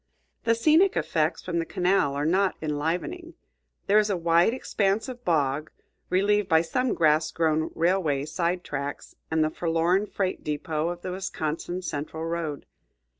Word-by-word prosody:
The 230 0 +4
scenic 315 +11 +4
effects 155 +1 0
from 170 -2 -2
the - - 0
canal 180 -5 +1
are 145 +1 -1
not 190 +4 +2
enlivening. 170 - -3 0.5
There 210 +2 +5
is 210 0 +1
a 195 - 0
wide 170 +3 +3
expanse 215 -3 0
of 245 -1 -8
bog, 150 - 0 0.4
relieved 205 +1 +2
by 160 -1 +5
some 250 +9 0
grass 155 0 +3
grown 160 -1 0
railway 165 -5 +1
side 175 +3 -1
tracks 145 0 -5
and 160 0 +2
the 155 - 0
forlorn 170 +5 +1
freight 190 -3 -2
depot 150 +1 -2
of 175 0 -6
the 185 - -3
Wisconsin 180 -1 -4
Central 160 0 -4
road. 165 -3 -3
170 Hz, 155 wpm, -26 LUFS, 155-195 Hz, 0.5 s, There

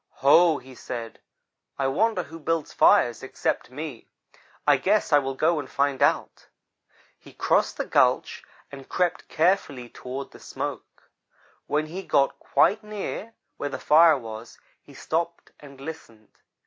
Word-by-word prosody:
'Ho!' 160 +2 +6
he 130 0 -13
said, 115 -2 -7 0.6
'I 135 - 0
wonder 200 +5 +1
who 165 +1 -11
builds 165 0 -2
fires 120 -2 +4
except 130 - -3
me. 140 -2 -8 0.6
I 145 -2 +5
guess 195 +4 +1
I 145 - +7
will 135 -1 -4
go 160 +3 +2
and 135 -3 -7
find 140 -1 0
out.' - - 0 0.7
"He - - -16
crossed - - +1
the - - -2
gulch - - +1 0.3
and 135 -2 -11
crept 180 -2 -1
carefully 155 -8 0
toward 130 +3 -7
the - - -14
smoke. - - -7 0.6
When 150 +1 0
he 175 +5 -6
got 140 -7 +1
quite 215 +2 +2
near 210 +1 -6 0.2
where 145 - -3
the - - -5
fire 160 0 +5
was, 115 -1 -9 0.2
he - - -17
stopped 170 +1 -3
and 140 -2 -14
listened. 125 -8 -10
145 Hz, 150 wpm, -25 LUFS, 130-170 Hz, 0.7 s, I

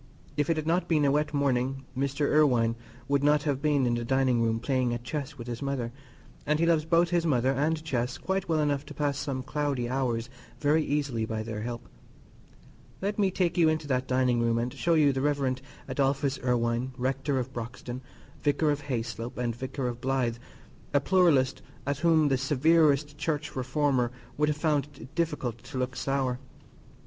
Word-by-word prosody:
If 145 +1 0
it 165 - +2
had 155 - -2
not 170 +3 +1
been 155 -3 +3
a 140 - +4
wet 150 +1 +1
morning, 135 -2 0
Mr. 140 +2 0
Irwine 125 -7 +3 0.3
would 140 0 +1
not 150 0 +4
have 140 -3 -1
been 145 -3 +2
in 120 - +2
the 120 0 -1
dining 130 -1 +2
room 115 -1 +1
playing 125 -1 0
at 120 - -7
chess 140 +3 -4
with 120 - -7
his 120 -1 -5
mother, 135 -4 -2 0.5
and 150 +1 +1
he 165 - +2
loves 165 -2 +3
both 170 +1 +3
his 175 -1 +2
mother 130 -5 +2
and 155 +4 0
chess 125 -5 -1
quite 190 -2 -2
well 160 -1 +2
enough 145 -2 0
to - - -9
pass 145 -1 0
some 135 -3 -3
cloudy 140 -3 -1
hours 120 -3 -1 0.3
very 150 +2 +3
easily 140 -6 -1
by 110 0 -2
their 110 -1 -5
help. 120 +1 -5 1.1
Let 205 +2 -2
me 195 -2 +4
take 180 -2 0
you 165 -2 +6
into 155 -1 -1
that 130 0 0
dining 125 -2 +2
room 115 0 +2
and 120 +1 -1
show 170 -1 +1
you 145 -3 +4
the 130 - -1
Rev. 140 -3 +1 0.3
Adolphus 140 0 0
Irwine, 120 +1 0
Rector 135 +2 -1
of 130 +1 -3
Broxton, 120 +1 -6 0.4
Vicar 150 +1 +2
of 145 0 -2
Hayslope, 120 -1 -4
and 120 -2 -1
Vicar 130 +1 -3
of 120 0 -5
Blythe, 130 -3 0 0.6
a - - +7
pluralist 145 -5 +3 0.2
at 140 0 -1
whom 160 -2 +4
the 135 -1 +2
severest 145 +1 +3
Church 150 -2 -2
reformer 130 -1 +1 0.2
would 150 0 +2
have 150 - -1
found 150 -3 +1
it 125 +4 -11
difficult 150 -9 -1
to 130 - -8
look 130 0 -2
sour. 135 -2 -1
135 Hz, 190 wpm, -28 LUFS, 125-150 Hz, 1.1 s, a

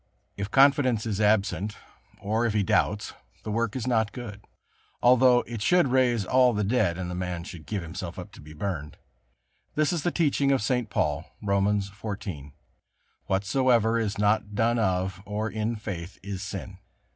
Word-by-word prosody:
If 100 +1 -4
confidence 135 -4 +4
is 105 -2 -2
absent, 105 0 +1 0.4
or 110 +4 0
if 110 - -2
he 105 - +3
doubts, 105 +2 +1 0.3
the 110 - -4
work 115 +1 -1
is 125 -3 -3
not 110 -4 +1
good, 105 -5 -8 0.6
although 125 0 +5
it 115 -3 -6
should 175 +3 +3
raise 125 -5 +2
all 125 +2 +4
the 105 0 0
dead 100 -5 +1
and 95 -1 -4
the 90 - -5
man 90 -1 -3
should 85 -5 -10
give 100 -4 -3
himself 85 +1 -6
to 95 +2 -10
be 75 +1 -12
burned. 75 -3 -4 0.8
This 155 +2 +2
is 170 - -1
the 175 - +1
teaching 145 -5 +1
of 135 -6 +2
St. 125 -1 0
Paul, 75 -7 -2
Romans 100 0 0
xiv: 95 -9 -6 0.7
"Whatsoever 115 +3 +2
is 110 -1 -2
not 105 0 +1
done 115 +2 +2
of 95 -2 0
or 105 +2 -3
in 110 +2 -2
faith 100 -4 -6
is 100 -1 -5
sin." 100 -2 -6
105 Hz, 170 wpm, -26 LUFS, 95-120 Hz, 0.8 s, although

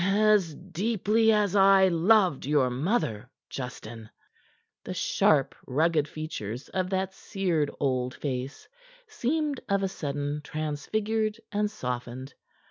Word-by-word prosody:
"As 200 -4 +3
deeply 210 +4 +1
as 210 -2 +2
I 195 -1 +6
loved 180 -4 +3
your 140 -4 +3
mother, 125 - -1 0.2
Justin." 115 -4 -7 0.7
The - - -5
sharp, - - +2
rugged 155 +2 +2
features 130 -7 -6
of 185 -1 -2
that 190 0 -1
seared 180 -7 -1
old 130 -2 0
face 130 -1 -5 0.4
seemed 305 - -1
of 200 0 +1
a - - +2
sudden 145 -4 -3
transfigured 210 +10 -2
and 210 0 0
softened. 125 - -5
170 Hz, 115 wpm, -27 LUFS, 140-210 Hz, 0.7 s, I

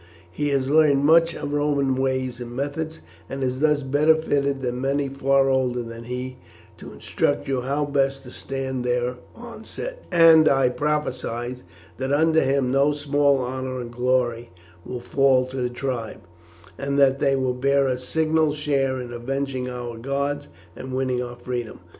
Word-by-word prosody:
He 145 +11 -2
has 135 -2 0
learned 145 -1 +4
much 165 +2 +5
of 145 0 -5
Roman 145 -2 +1
ways 130 -1 -1
and 120 0 -7
methods, 145 +4 -4 0.3
and 135 0 -4
is 130 0 -1
thus 150 -1 +2
better 145 +4 +4
fitted 140 -3 -1
than 125 0 -2
many 140 +1 0
far 135 0 +2
older 130 -2 +1
than 115 0 -9
he 125 +1 -5 0.4
to - - -10
instruct - - -1
you 135 -2 0
how 140 +3 -1
best 135 -1 0
to 125 - -11
stand 130 -2 -4
their 125 0 -1 0.2
onset, - - -8
and 165 -2 +7
I 135 -2 +3
prophesy 125 -3 -2 0.4
that 130 +1 -2
under 160 +2 +3
him 135 -1 +1
no 140 +2 +3
small 145 -1 +2
honour 130 0 -4
and 120 -1 -6
glory 120 -1 0 0.3
will 125 +2 -6
fall 130 +1 +3
to 130 +1 -8
the 125 - 0
tribe, 120 -3 -4 0.6
and 140 +1 -1
that 135 -1 +4
they 135 -1 +2
will 130 -1 0
bear 140 +2 +2
a 125 -1 -1
signal 155 +3 +1
share 140 -3 0
in 120 -1 -7
avenging 130 +1 -3
our 120 -2 -6
gods 140 +3 -2 0.3
and 130 0 -6
winning 130 -1 0
our 120 0 -6
freedom. 120 -1 -5
135 Hz, 165 wpm, -23 LUFS, 125-145 Hz, 0.6 s, and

